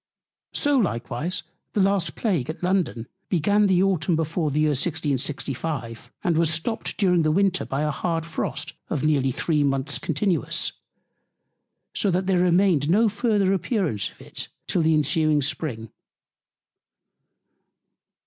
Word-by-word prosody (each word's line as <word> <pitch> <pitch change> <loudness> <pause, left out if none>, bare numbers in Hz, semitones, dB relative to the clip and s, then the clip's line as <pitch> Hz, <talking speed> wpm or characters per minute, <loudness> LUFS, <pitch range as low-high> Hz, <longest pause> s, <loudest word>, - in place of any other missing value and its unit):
So 290 -2 +2
likewise 150 - -1 0.3
the - - 0
last 190 -5 +1
Plague 175 - -1
at 160 - -6
London 175 -11 0 0.2
began 205 +4 +3
the 185 -1 +3
Autumn 180 -3 +1
before 160 0 -1
the 150 +2 0
Year 155 - +3
1665, 140 -4 -2
and 165 -2 +2
was 165 -1 +2
stopt 165 +8 -2
during 180 -4 +3
the 155 - +2
Winter 190 +2 +2
by 135 +2 -2
a 150 - +1
hard 165 +2 -2
Frost 155 -2 -4 0.2
of 150 -4 -2
near 150 -2 +3
three 150 +3 0
Month's 135 0 0
Continuance; 165 +3 0 1.2
so 205 - +1
that 185 +1 +1
there 185 -2 +2
remained 175 -4 +3
no 215 +5 +4
further 205 -2 +1
Appearance 185 - -1
of - - -22
it - - -6 0.2
till 175 - 0
the 160 0 +3
ensuing 150 0 +2
Spring. 130 -7 -3
165 Hz, 140 wpm, -24 LUFS, 145-190 Hz, 1.2 s, no